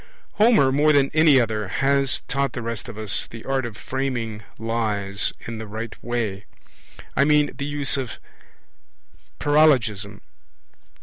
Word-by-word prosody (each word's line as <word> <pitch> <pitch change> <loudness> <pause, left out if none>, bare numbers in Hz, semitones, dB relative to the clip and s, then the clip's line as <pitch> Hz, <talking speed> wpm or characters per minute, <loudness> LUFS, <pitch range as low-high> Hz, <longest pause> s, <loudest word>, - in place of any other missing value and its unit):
Homer 210 - +5
more 150 +3 +4
than 140 -1 +3
any 155 -3 +6
other 110 -3 -1
has 135 +6 +1
taught 140 -2 -1
the 120 - -5
rest 115 +1 -4
of 110 - -9
us 110 -2 -1
the 115 -1 -11
art 135 -2 0
of 110 -2 -10
framing 125 -5 -3 0.2
lies 105 -3 -1
in 115 -1 -6
the 110 - -7
right 110 +2 -6
way. 110 -5 -3 0.7
I - - +4
mean 150 0 +3
the 140 - -4
use 145 -1 -1
of 130 -4 -4 1.2
paralogism. 130 -10 +2
120 Hz, 140 wpm, -23 LUFS, 110-140 Hz, 1.2 s, any